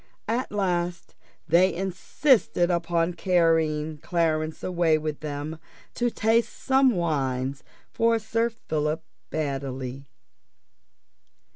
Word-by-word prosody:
At 235 +4 -1
last 180 -4 -1 0.3
they 175 +4 +5
insisted 190 - +1
upon 170 0 0
carrying 160 -4 +1
Clarence 160 -1 -1
away 170 -3 +2
with 155 -1 -4
them 150 +1 -5 0.3
to 240 0 0
taste 225 +1 +2
some 265 -3 +3
wines 135 -5 -1 0.3
for 230 0 +2
Sir 225 +2 0
Philip 155 -7 -2 0.3
Baddely. 135 -3 -4
170 Hz, 95 wpm, -26 LUFS, 155-195 Hz, 0.3 s, they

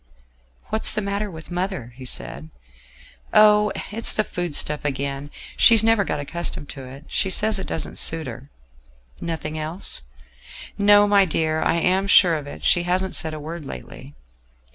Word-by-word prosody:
"What's 220 - 0
the - - +1
matter 200 +1 -2
with 160 -1 -11
mother?" 175 - -3
he 130 0 -10
said. 80 - -4 0.9
"Oh! 210 -1 +6 0.2
it's 225 +2 -1
the 215 - +1
food 175 -6 -3
stuff 150 0 0
again: 140 0 -3 0.3
she's 225 -2 +6
never 225 -2 +4
got 150 - -3
accustomed 150 0 -5
to 135 -2 -8
it; 135 +4 -11
she 190 - 0
says 210 +2 +2
it 190 - -6
doesn't 160 - -3
suit 165 -1 0
her." 130 +3 -9 0.7
"Nothing 155 -2 -4
else?" 155 - -2 0.7
"No, 205 0 +5
my 200 -1 +5
dear, 160 -2 0
I - - +1
am 185 +3 +1
sure 185 -3 +6
of 150 -3 -3
it. - - -10
She 175 - +4
hasn't 185 +2 -1
said 160 -1 -3
a - - -6
word 160 +2 -7
lately." 70 - -10
170 Hz, 165 wpm, -22 LUFS, 145-200 Hz, 0.9 s, Oh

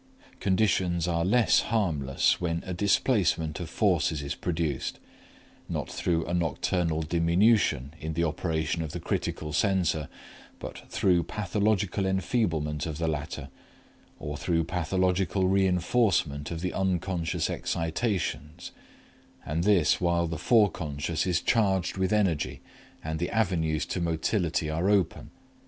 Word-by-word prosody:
Conditions 95 -4 +1
are 85 -1 0
less 110 +6 +4
harmless 80 - +1
when 85 -1 -1
a 95 - -4
displacement 95 - +1
of 85 -3 -5
forces 85 -7 +1
is 70 - -3
produced, 80 -6 -2 0.7
not - - -3
through 85 -2 0
a 85 - -3
nocturnal 85 0 0
diminution 85 - +2
in 80 +1 -4
the 85 +2 0
operation 80 0 -1
of 80 -1 -5
the 85 - -4
critical 75 -2 -3
censor, 90 -6 +1 0.5
but - - -9
through 90 -2 +2
pathological 100 0 0
enfeeblement 85 - 0
of 80 -2 -4
the 85 0 -1
latter 75 -1 -4 0.7
or 75 0 -5
through 85 0 0
pathological 90 +2 0
reinforcement 90 - +1
of 80 -1 -5
the 90 - -2
unconscious 95 -2 -1
excitations, 80 -3 -2 0.7
and 80 +3 -1
this 95 -6 +3
while 85 -1 +2
the 80 -2 -4
foreconscious 85 - +1
is 90 -2 +1
charged 95 -6 +1
with 95 +1 0
energy 100 -8 +1 0.4
and 80 0 -3
the 85 - -1
avenues 85 -8 0
to 90 - -3
motility 85 0 0
are 80 +5 0
open. 100 -5 +1
85 Hz, 125 wpm, -28 LUFS, 80-95 Hz, 0.7 s, less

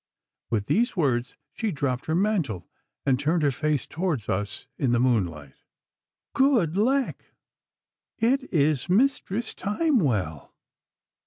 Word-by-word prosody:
With 105 -3 0
these 235 - +1
words 130 -6 0 0.2
she 225 - -2
dropped 135 -5 -2
her 160 - +1
mantle 170 - 0 0.4
and 130 -2 +2
turned 160 +3 +1
her 145 - +3
face 150 -1 -1
towards 160 - -2
us 100 +2 -2
in 130 -4 +2
the 120 - +3
moonlight. 90 - -1 0.7
'Good 240 - +3
lack! 260 +6 0 0.8
it 265 +4 +1
is 150 -2 +1
Mistress 225 0 +1
Timewell! 155 - 0
155 Hz, 115 wpm, -26 LUFS, -, 0.8 s, her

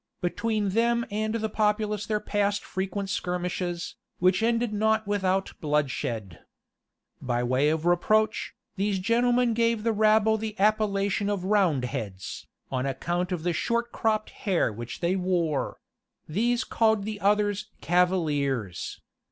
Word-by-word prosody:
Between 210 +3 -1
them 235 +3 +2
and 215 +2 -1
the 220 -1 -1
populace 210 -1 0
there 215 -1 0
passed 205 -1 0
frequent 195 +1 -3
skirmishes, 180 -2 -3 0.2
which 185 +3 +3
ended 230 0 +1
not 220 +1 +2
without 195 -2 0
bloodshed. 130 - -1 0.8
By 120 -1 -1
way 130 +4 +2
of 160 +1 -1
reproach, 215 +5 +2 0.2
these 200 0 +1
gentlemen 240 +4 +2
gave 230 -1 +1
the 230 -1 +2
rabble 220 +1 +4
the 215 -1 -5
appellation 205 -1 +2
of 200 -3 -1
Roundheads, 130 - -1 0.2
on 130 0 -1
account 175 +7 -2
of 175 -3 -2
the 175 0 +1
short 235 +7 -1
cropped 215 -1 0
hair 180 - 0
which 120 +2 -7
they 175 +2 +1
wore: 175 -5 0 0.5
these 235 +9 +1
called 220 -2 +2
the 210 0 -4
others 205 +1 +1
Cavaliers. 145 - 0
200 Hz, 130 wpm, -27 LUFS, 175-215 Hz, 0.8 s, rabble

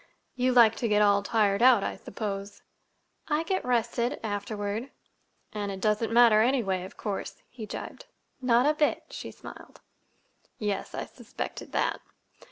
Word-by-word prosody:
"You 255 0 +1
like 230 -3 +6
to 235 - -1
get 210 -1 +3
all 200 -1 +4
tired 205 -1 +1
out, 245 -5 +6
I - - -2
suppose." 200 -2 -6 0.6
"I 305 +1 +1
get 375 +3 -1
rested—afterward." 225 -2 -2 0.6
"And 205 -2 -3
it 190 - -6
doesn't 215 +2 0
matter, 230 -2 +6
anyway, 220 -7 +1
of 190 - -12
course," 205 -3 -5
he 225 -4 -8
gibed. - - -8 0.3
"Not 245 0 +3
a 300 - +4
bit," 300 -1 +1
she - - -7
smiled. - - -12 0.8
"Yes, 205 -2 -3
I - - -3
suspected - - -7
that." - - 0
220 Hz, 145 wpm, -28 LUFS, 205-245 Hz, 0.8 s, like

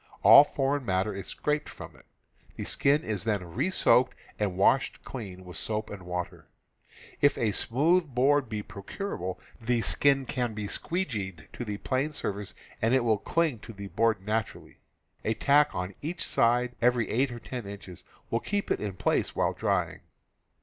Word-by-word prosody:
All - - +10
foreign 140 -1 -1
matter 95 -1 0
is 100 0 -7
scraped 150 0 -2
_. - - -8
from - - -10
it; - - -20 0.5
the - - -5
skin 145 +3 +3
is 105 -5 -2
then 105 -5 -1
re 175 - 0
soaked 130 -8 +3 0.2
and, 105 -1 +1
^^,,. - - -11
washed 130 +8 +2
clean 95 -7 -8
with 90 -2 -8
soap 110 +3 -2
and 100 -2 -7
water. 90 0 -5 0.7
If 145 0 +4
a 110 -3 +1
smooth 160 - +2
e - - -19
board 135 0 +2
be 105 -1 -3
procurable, 95 - -5 0.2
the 120 +1 +1
skin 135 +2 +3
can 120 -4 -2
be 105 -1 -4
"squee 175 - -2
geed" 95 - -6
to - - -5
the 105 -3 -4
planed 135 +7 -1
surface 105 -3 -4 0.3
and 115 +3 +3
it 130 - +3
will 110 -3 +2
cling 160 -1 0
to 115 - -10
the 100 -1 -8
board 110 -4 +1
naturally. 110 0 -3 0.4
A 110 - 0
tack 145 +4 +4
on 90 +2 -3
each 170 +4 -3
side 125 +1 +2
every 120 -2 +3
eight 130 +4 +2
or 120 - -7
ten 120 -3 -7
inches 100 -3 -10 0.3
will 115 - +2
keep 205 +7 -2
it - - +1
in 105 -2 -3
place 90 - 0
while - - +1
drying. - - -1
115 Hz, 185 wpm, -28 LUFS, 100-135 Hz, 0.7 s, All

